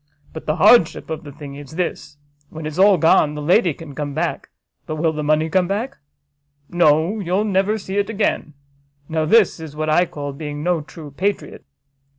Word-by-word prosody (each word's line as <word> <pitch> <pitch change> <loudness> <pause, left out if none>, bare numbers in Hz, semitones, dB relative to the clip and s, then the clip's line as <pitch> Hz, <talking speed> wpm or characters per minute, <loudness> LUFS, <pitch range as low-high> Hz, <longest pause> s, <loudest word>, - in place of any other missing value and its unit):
But 160 - -9
the 155 - +1
hardship 195 -5 +4
of 160 +1 -4
the 145 - -9
thing 145 -1 -10
is 145 +1 -11
this: 175 -4 -4 0.3
when 160 0 -8
it's 155 +3 -5
all 195 0 +6
gone, 155 -2 +3
the - - -5
lady 175 +3 +3
can 150 0 -10
come 145 -1 -5
back, 165 +2 -3 0.4
but 155 - -3
will 160 +1 0
the 150 - -4
money 155 +1 +1
come 180 +2 +1
back? 225 +8 -3 0.7
No, 170 +4 +3
you'll 190 +2 0
never 200 +1 +1
see 195 -1 -3
it 200 - -1
again: 200 -8 -1 0.5
now 160 -1 -1
this 205 +1 +4
is 160 -2 -9
what 155 0 -1
I 175 +3 +3
call 145 -2 -6
being 145 0 -6
no 175 -1 +1
true 150 +1 -11
patriot." 195 +8 -3
160 Hz, 190 wpm, -20 LUFS, 150-190 Hz, 0.7 s, all